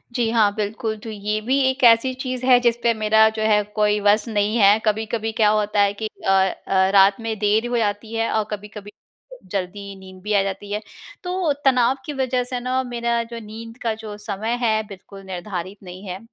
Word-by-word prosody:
जी 235 -2 +1
हाँ, 220 -3 +3
बिल्कुल। 220 +1 -3
तो 225 - -9
ये 210 0 -2
भी 260 +5 +1
एक 260 +1 -3
ऐसी 235 +2 +5
चीज़ 255 -1 -4
है, 255 -1 +6
जिस 235 -1 +2
पे 235 - +3
मेरा 220 0 +4
जो - - -2
है 210 -1 +3
कोई 210 0 +2
बस 205 +3 +3
नहीं 210 -1 0
है। 205 -1 +6
कभी-कभी 220 +1 -1
क्या 210 - +6
होता 210 -1 +1
है 200 0 +3
कि 220 - -1 0.2
अ, - - +4 0.4
अ, 190 0 +3
रात 195 +1 +5
में 225 -1 -3
देर 215 +3 +2
हो 240 0 -1
जाती 215 0 -2
है, 225 0 0
और 220 - +1
कभी-कभी 210 0 -8 0.6
जल्दी 200 +1 -4
नींद 185 -1 -13
भी 210 +1 -2
आ 200 - +4
जाती 195 +1 -5
है। 210 +1 -2 0.4
तो 360 -4 0
तनाव 255 -1 +4
की 300 - -4
वजह 260 -2 0
से 250 0 -4
ना, 255 +1 -1
मेरा 235 -1 -1
जो 230 0 -8
नींद 225 +2 -10
का 230 -2 0
जो 210 -1 -7
समय 215 +3 -3
है, 220 -1 +2
बिल्कुल 195 0 -12
निर्धारित 185 0 -6
नहीं 185 +1 -10
है। 185 +1 -5
215 Hz, 210 wpm, -22 LUFS, 205-235 Hz, 0.6 s, है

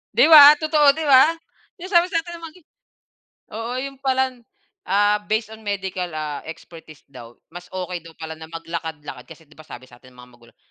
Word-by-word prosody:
'Di - - +5
ba? 295 -1 +10
Totoo, 300 -2 +3
'di 320 - -4
ba? 290 +3 +5 0.4
Yung 370 +3 -9
sabi 345 -1 +4
sa 345 -3 -1
atin 345 0 -10
ng 335 - -10
magi 330 +3 -14 0.9
oo 225 +2 -6
yun 270 +1 -7
pala, 265 -1 0 0.6
ah, 205 +2 +2
based 220 0 -2
on, 220 - -12
ah, 220 - -20
medical 190 -3 -4 0.4
expertise 160 -2 -13
daw. 120 -3 -14 0.2
Mas 175 +1 -11
okey 180 -1 -5
daw 165 0 -16
pala 160 0 -8
na 160 0 -11
mag-lakad-lakad, 160 -5 -8
kasi - - -14
'di 155 - -22
ba 155 - -15
sabi 125 - -11
satin 125 +1 -19
ng 125 - -23
mga 125 0 -15
magulang, 120 -1 -22
200 Hz, 195 wpm, -21 LUFS, -, 0.9 s, ba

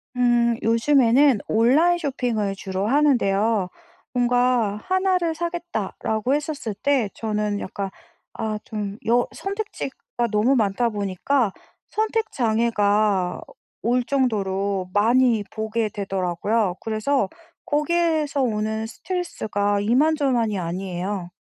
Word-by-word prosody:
음 240 -1 +3
요즘에는 245 +1 +4
온라인 290 +11 +4
쇼핑을 245 - -1
주로 190 +1 -3
하는데요. 225 -8 +2 0.4
뭔가 245 -4 +2
'하나를 370 -3 +1
사겠다.'라고 315 - -2
했었을 290 -7 -2
때 260 -2 +1
저는 210 -2 -2
약간 195 +1 -4 0.4
아 220 -1 -3
좀 205 -2 -5
여 240 +1 +3
선택지가 390 - -4
너무 220 +6 +3
많다 225 +1 +1
보니까 205 +3 0 0.4
선택 440 +1 -1
장애가 210 -5 +1 0.4
올 245 +2 +2
정도로 200 -7 0
많이 230 +1 +3
보게 220 0 -2
되더라고요. 195 0 -1
그래서 220 0 0 0.4
거기에서 305 -1 +1
오는 220 -2 -1
스트레스가 215 - -2
이만저만이 250 -3 +2
아니에요. 180 +1 -4
230 Hz, 250 characters per minute, -23 LUFS, 205-275 Hz, 0.4 s, 요즘에는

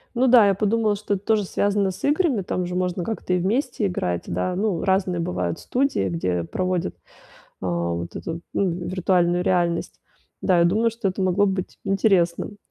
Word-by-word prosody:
Ну 255 +2 +3
да, 235 -4 +7
я 195 - +4
подумала, 215 +1 +1
что 205 0 -2
это 195 +1 -8
тоже 220 -2 +2
связано 200 +1 0
с 185 - -8
играми, 290 - +2
там 180 0 -2
же 180 - -4
можно 180 0 -1
как-то 210 -3 -3
и 180 - +2
вместе 225 +3 0
играть, 90 - -2
да. 90 - -1
Ну, 195 -4 -1
разные 190 -2 +1
бывают 90 - -2
студии, 260 - 0
где 90 0 -1
проводят, 185 - -2 0.7
а, 85 -2 -1
вот 85 0 -5
эту, 165 +1 -5
ну, 195 -3 +1
виртуальную 180 0 +1
реальность. 175 -2 0 0.4
Да, 180 -3 +3
я 170 - +5
думаю, 220 +7 +2
что 230 -2 -4
это 190 +1 -3
могло 185 +2 +3
быть 190 -1 -3
интересным. 195 -1 +1
185 Hz, 180 wpm, -23 LUFS, 170-205 Hz, 0.7 s, да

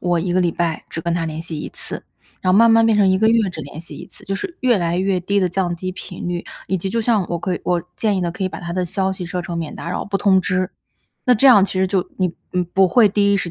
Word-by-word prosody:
“我 175 -1 +1
1 175 +1 -1
个 185 - +3
礼 175 -1 +2
拜 165 -1 -2
只 165 - -5
跟 170 0 -1
他 170 -1 -1
联 160 0 -5
系 165 -2 -6
1 - - -5
次。” - - -7 0.4
然 185 - +1
后 190 - +5
慢 230 0 +7
慢 225 0 +5
变 220 - +3
成 205 -2 +4
1 190 0 +3
个 220 - +4
月 225 -4 +3
只 160 - -7
联 145 +2 -9
系 170 - -10
1 - - -9
次， - - -14
就 195 - -2
是 335 - -5
越 245 -4 +3
来 170 -1 0
越 190 0 +1
低 200 +3 0
地 190 - +2
降 175 -1 -1
低 185 +2 -4
频 180 -1 -7
率， 175 0 -2 0.3
以 190 - 0
及 190 - -3
就 230 +4 -1
像 220 -5 +1
我 170 - -2
可 180 +2 -2
以 - - -6
我 175 -1 +1
建 210 -3 +1
议 - - 0
呢， 170 -1 -1
可 190 - -6
以 185 - +1
把 - - -7
他 170 -1 -6
的 180 0 -1
消 190 +2 -1
息 180 -2 -6
设 180 +1 -3
成 170 -1 -4
免 165 -2 -5
打 170 - -6
扰 - - -3
不 200 -1 -1
通 190 -1 +4
知， 185 0 -1 0.6
那 250 - +6
这 245 +5 +4
样 240 -7 +8
其 195 -1 0
实 190 - +3
就 185 -1 -1
你 180 -3 0 0.2
你 180 0 +1
不 185 +2 +2
会 230 +2 +5
第 200 0 +2
一 - - +3
时 180 -3 -2
185 Hz, 320 characters per minute, -20 LUFS, 175-200 Hz, 0.6 s, 样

